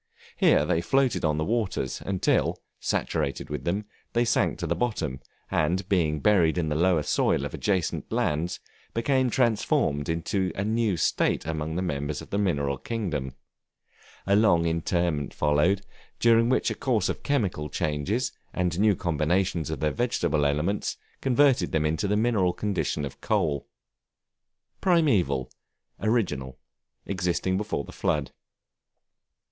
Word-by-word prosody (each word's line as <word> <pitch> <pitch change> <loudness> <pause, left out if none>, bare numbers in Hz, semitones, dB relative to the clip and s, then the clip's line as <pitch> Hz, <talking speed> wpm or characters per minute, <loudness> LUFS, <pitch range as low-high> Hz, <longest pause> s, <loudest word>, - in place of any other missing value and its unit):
Here - - +4
they 80 - +1
floated 135 +3 +1
on 75 -2 +1
the 80 - 0
waters 105 - -1
until, 95 -2 +1 0.2
saturated 70 - -2
with 75 -3 -4
them, 100 +5 -1 0.3
they 120 +1 +2
sank 115 - +1
to - - -3
the - - 0
bottom, 105 - -2 0.3
and 90 +5 +1
being 80 -6 +1
buried 90 -5 +3
in 80 -3 0
the 75 - -1
lower 85 -1 +3
soil - - +1
of - - -6
adjacent 95 -5 -1
lands, 80 +4 0 0.4
became 130 +2 +2
transformed 105 - +1
into 90 +3 -1
a 100 - -1
new 110 -3 +1
state 75 - +1
among 80 0 -3
the 90 - -1
members 75 -4 -2
of - - -11
the 100 - 0
mineral 70 -8 0
kingdom. 80 - -3 0.9
A 100 - +3
long 85 -6 +4
interment 85 -2 -1
followed, 85 +7 +2 0.3
during 115 0 +4
which 130 - +2
a - - 0
course 115 -8 0
of - - -3
chemical 100 - -1
changes, 80 - -1 0.2
and 90 -1 0
new 105 -1 +4
combinations 85 0 0
of 80 -4 -4
their 75 -1 +2
vegetable 85 -11 +1
elements, 75 +8 -1 0.2
converted 135 0 +3
them 80 0 +1
to 105 - -1
the 105 +1 +1
mineral 105 -6 +2
condition 95 -8 -1
of 70 - -9
coal. 70 -3 0 1.1
Primeval, 95 - +2 0.5
original, 75 - -1 0.5
existing 95 -1 -1
before 100 -7 -2
the - - -11
flood. 75 -3 -1
90 Hz, 140 wpm, -26 LUFS, 75-105 Hz, 1.1 s, Here